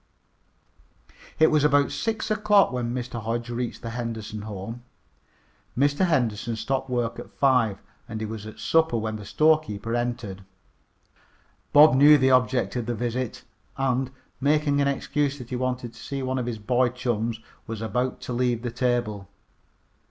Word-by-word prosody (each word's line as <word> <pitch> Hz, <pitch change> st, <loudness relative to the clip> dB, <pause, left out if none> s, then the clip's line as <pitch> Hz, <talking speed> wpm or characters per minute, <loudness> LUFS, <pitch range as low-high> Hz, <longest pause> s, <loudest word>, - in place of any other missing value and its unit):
It 160 Hz, -, +5 dB
was 155 Hz, -2 st, +3 dB
about 145 Hz, -1 st, +3 dB
six 220 Hz, -1 st, -2 dB
o'clock 210 Hz, -4 st, +4 dB
when 125 Hz, -2 st, -2 dB
Mr. 120 Hz, -1 st, -4 dB
Hodge 115 Hz, +2 st, -3 dB
reached 120 Hz, 0 st, -4 dB
the 115 Hz, -, -4 dB
Henderson 115 Hz, -3 st, -5 dB
home. 105 Hz, +3 st, -7 dB, 1.0 s
Mr. 145 Hz, +7 st, +3 dB
Henderson 120 Hz, -7 st, 0 dB
stopped 135 Hz, +3 st, -2 dB
work 120 Hz, -2 st, -1 dB
at -, -, -9 dB
five, 125 Hz, -7 st, +2 dB, 0.3 s
and 110 Hz, -1 st, -4 dB
he 110 Hz, -, -3 dB
was 110 Hz, 0 st, -6 dB
at 110 Hz, -, -10 dB
supper 160 Hz, -6 st, +2 dB
when 110 Hz, -1 st, -3 dB
the 105 Hz, -, -10 dB
storekeeper 115 Hz, -2 st, +1 dB
entered. 120 Hz, -5 st, -3 dB, 1.3 s
Bob 150 Hz, 0 st, +8 dB
knew 145 Hz, +3 st, +7 dB
the 130 Hz, -1 st, +3 dB
object 125 Hz, -1 st, +2 dB
of 120 Hz, -2 st, -2 dB
the 120 Hz, -, -1 dB
visit, 120 Hz, +1 st, -3 dB, 0.3 s
and, 130 Hz, -1 st, 0 dB, 0.3 s
making 145 Hz, +1 st, +2 dB
an 140 Hz, -, +2 dB
excuse 140 Hz, 0 st, -1 dB
that 125 Hz, -2 st, -10 dB
he -, -, -1 dB
wanted 125 Hz, -1 st, -2 dB
to 120 Hz, -, -15 dB
see 140 Hz, -1 st, -4 dB
one 130 Hz, 0 st, -1 dB
of 120 Hz, -, -3 dB
his 120 Hz, -2 st, -3 dB
boy 120 Hz, +4 st, +2 dB
chums, 115 Hz, -2 st, -2 dB, 0.3 s
was 115 Hz, -1 st, -5 dB
about 125 Hz, +4 st, -2 dB
to 125 Hz, -, -5 dB
leave 120 Hz, -1 st, 0 dB
the 120 Hz, -, -3 dB
table. 120 Hz, -5 st, -1 dB
125 Hz, 160 wpm, -25 LUFS, 115-135 Hz, 1.3 s, Bob